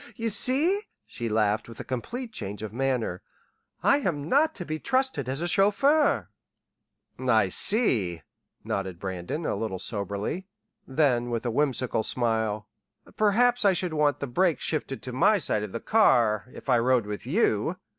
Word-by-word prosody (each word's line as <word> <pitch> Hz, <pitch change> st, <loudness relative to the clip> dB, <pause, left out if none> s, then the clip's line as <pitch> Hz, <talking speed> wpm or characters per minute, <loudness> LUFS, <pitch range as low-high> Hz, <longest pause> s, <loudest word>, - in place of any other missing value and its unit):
"You 225 Hz, 0 st, -2 dB
see," 290 Hz, -, +4 dB, 0.2 s
she 120 Hz, -2 st, -5 dB
laughed 110 Hz, +1 st, 0 dB
with 115 Hz, -, -11 dB
a -, -, -4 dB
complete 225 Hz, -, -5 dB
change 105 Hz, -, -5 dB
of 110 Hz, -, -6 dB
manner, 125 Hz, -8 st, -1 dB, 0.6 s
"I 280 Hz, -, +5 dB
am 150 Hz, -, -2 dB
not 310 Hz, +4 st, +2 dB
to 175 Hz, -, -5 dB
be 155 Hz, 0 st, -4 dB
trusted 260 Hz, -, -1 dB
as 135 Hz, +4 st, -3 dB
a -, -, 0 dB
chauffeur." 275 Hz, -, +3 dB, 0.9 s
"I 110 Hz, -6 st, +2 dB
see," 100 Hz, -, +1 dB, 0.4 s
nodded 95 Hz, -3 st, -3 dB
Brandon, 95 Hz, -, -4 dB
a -, -, 0 dB
little 105 Hz, -4 st, -3 dB
soberly; 100 Hz, -, -4 dB, 0.4 s
then, 130 Hz, -4 st, +1 dB
with 120 Hz, 0 st, -3 dB
a 120 Hz, -, 0 dB
whimsical 130 Hz, -3 st, 0 dB
smile: 110 Hz, -2 st, -1 dB, 0.5 s
"Perhaps 240 Hz, +4 st, +3 dB
I 200 Hz, -2 st, +5 dB
should 180 Hz, -2 st, -2 dB
want 150 Hz, -2 st, +1 dB
the -, -, -1 dB
brakes 170 Hz, +6 st, +1 dB
shifted 145 Hz, -4 st, -3 dB
to 125 Hz, -, -5 dB
my 205 Hz, +12 st, +4 dB
side 130 Hz, -, -1 dB
of 105 Hz, -2 st, -5 dB
the 115 Hz, -, -4 dB
car 115 Hz, -, +3 dB
if -, -, -12 dB
I 120 Hz, -, +4 dB
rode 125 Hz, -1 st, +2 dB
with 105 Hz, +3 st, -6 dB
you!... 160 Hz, -, +1 dB
130 Hz, 165 wpm, -26 LUFS, -, 0.9 s, I